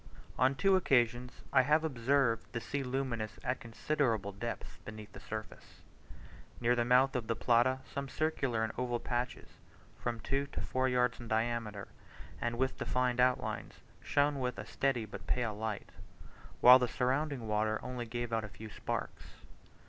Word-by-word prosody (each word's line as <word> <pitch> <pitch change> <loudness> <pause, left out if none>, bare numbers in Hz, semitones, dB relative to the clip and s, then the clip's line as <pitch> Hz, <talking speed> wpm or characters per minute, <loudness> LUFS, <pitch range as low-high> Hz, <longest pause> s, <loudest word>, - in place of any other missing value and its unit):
On 130 +2 +4
two 195 +5 +4
occasions 125 -7 +1
I 130 - +7
have 150 +4 +3
observed 130 -4 +1
the 115 - -1
sea 140 +4 -3
luminous 125 -4 -2
at 130 - -1
considerable 115 -3 -1
depths 115 +4 -6
beneath 110 -1 -9
the - - -9
surface. 110 0 -8 0.8
Near 120 0 +3
the 120 - +2
mouth 125 +3 +4
of 120 -3 -2
the 115 - 0
Plata 125 +3 +3
some 140 -1 -5
circular 135 -8 0
and 110 - -2
oval 120 -1 0
patches, 125 +1 -3 0.5
from 120 -1 -2
two 140 +4 -1
to - - -3
four 130 0 0
yards 125 -1 +1
in 120 - -8
diameter, 110 -2 -1 0.5
and 120 0 -1
with 130 +1 0
defined 125 -1 0
outlines, 125 0 +1 0.3
shone 145 0 +2
with 125 -1 -2
a - - -6
steady 135 -5 0
but 105 - -9
pale 120 -3 0
light; 105 0 -4 0.7
while 125 +1 +10
the 125 - +1
surrounding 130 0 -1
water 110 0 +1
only 125 -2 -4
gave 120 0 -4
out 110 -1 +1
a 110 - -6
few 110 +1 -10
sparks. - - -4
125 Hz, 165 wpm, -33 LUFS, 115-130 Hz, 0.8 s, while